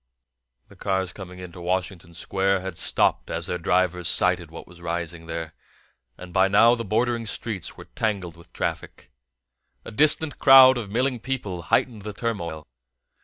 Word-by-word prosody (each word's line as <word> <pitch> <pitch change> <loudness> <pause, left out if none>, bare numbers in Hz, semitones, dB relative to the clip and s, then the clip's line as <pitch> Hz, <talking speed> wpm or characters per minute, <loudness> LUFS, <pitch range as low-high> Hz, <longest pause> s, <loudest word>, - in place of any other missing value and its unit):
The - - -17
cars 95 -1 -2
coming 90 -2 -10
into 90 -1 -10
Washington 90 -1 -3
Square 95 +2 0
had 95 -2 -6
stopped - - +1
as - - -3
their 90 - -3
drivers 90 0 +1
sighted 90 -1 +2
what 80 - -10
was 85 0 -16
rising 85 -1 -4
there, 80 -1 -5 0.6
and 90 -1 -11
by 95 +1 +4
now 110 +4 +5
the 115 -1 -2
bordering 115 +2 -1
streets 110 -4 -5
were - - -11
tangled 95 -6 -3
with 85 +1 -18
traffic. - - -5 0.7
A - - -8
distant 150 +4 +2
crowd 130 -1 +8
of 115 -5 -5
milling 125 +3 0
people 110 -8 -4
heightened 110 - 0
the 105 +1 -6
turmoil. 85 -9 -4
95 Hz, 160 wpm, -24 LUFS, 85-115 Hz, 0.7 s, crowd